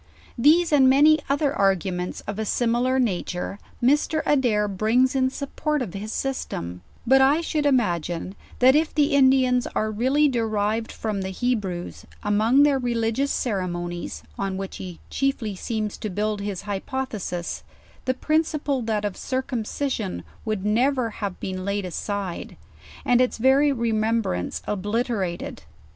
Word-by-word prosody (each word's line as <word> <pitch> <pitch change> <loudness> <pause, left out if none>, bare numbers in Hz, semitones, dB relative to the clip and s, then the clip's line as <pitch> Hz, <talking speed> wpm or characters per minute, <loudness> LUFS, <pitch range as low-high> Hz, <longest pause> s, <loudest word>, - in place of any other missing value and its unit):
These 315 +7 +4
and 265 -3 +6
many 300 +4 +6
other 280 0 +1
arguments 190 -2 0
of 200 0 -6
c, - - 0
similar 240 +4 +1
nature; 195 -4 -2 0.2
Mr. 295 +4 +2
Adair 240 -8 +2
brings 225 +7 +2
in 260 -1 +3
support 285 +1 -2
of 190 -7 -7
his 205 +2 -5
system; 90 - -4 0.2
but 265 +2 +5
f 290 +5 +4
should 300 -3 0
imagine, 175 - 0 0.2
that 260 +2 +6
if 310 +1 +1
the 290 -2 +3
Indians 260 -2 +4
are 215 0 0
really 260 +7 +3
derived 225 -3 0
from 210 -3 -3
the 190 - -3
Hebrews, 190 -5 -3 0.2
among 220 +7 +4
their 285 -2 +3
religious 240 +2 0
ceremonies, 175 - -3 0.2
on 195 -1 -2
which 195 0 -5
he 180 -3 -8
chiefly 270 -7 -1
seems 215 +1 -3
to 215 - -3
build 210 +2 -1
his 200 -3 -4
hypothesis, 205 -4 -4 0.4
the 255 - +1
principal, 305 -2 0
that 215 -2 -1
of 200 -3 -2
circumcision, 255 - -3 0.2
would 210 -3 -2
never 245 +2 +2
have 200 -3 -5
been 185 -1 -4
laid 200 0 -1
aside, 190 0 -4 0.5
and 245 0 +4
its 250 - +1
very 270 +5 +4
remembrance 225 - -1
obliterated. 205 -2 -2
225 Hz, 140 wpm, -24 LUFS, 200-265 Hz, 0.5 s, and